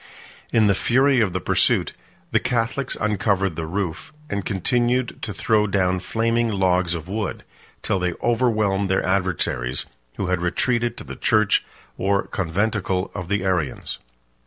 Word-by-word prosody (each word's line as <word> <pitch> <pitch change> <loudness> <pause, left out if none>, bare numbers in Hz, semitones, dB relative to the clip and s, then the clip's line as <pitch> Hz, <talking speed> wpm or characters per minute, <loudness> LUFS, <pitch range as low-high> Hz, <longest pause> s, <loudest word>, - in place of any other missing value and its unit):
In 110 -1 +4
the 100 - +5
fury 130 +5 +3
of 105 -4 +2
the - - -2
pursuit, - - +2 0.4
the - - +4
Catholics 125 +2 -1
uncovered 100 -4 +1
the 80 0 -4
roof, 90 - -3 0.2
and 100 -1 -1
continued 120 +5 0
to 110 - -3
throw 105 +2 +2
down 95 -2 +1
flaming 115 +4 0
logs 90 -3 +2
of 80 0 -6
wood, 105 +1 -3 0.4
till 95 - 0
they 90 -1 0
overwhelmed 110 -5 +2
their 95 - +1
adversaries, 85 -9 0 0.3
who 100 - -1
had 90 -1 0
retreated 120 +7 0
to - - -7
the - - -8
church 110 -3 +3 0.4
or 100 +1 +1
conventicle 95 +1 -1
of 90 -3 -5
the 100 0 0
Arians. 85 -9 -1
100 Hz, 150 wpm, -23 LUFS, 90-115 Hz, 0.4 s, the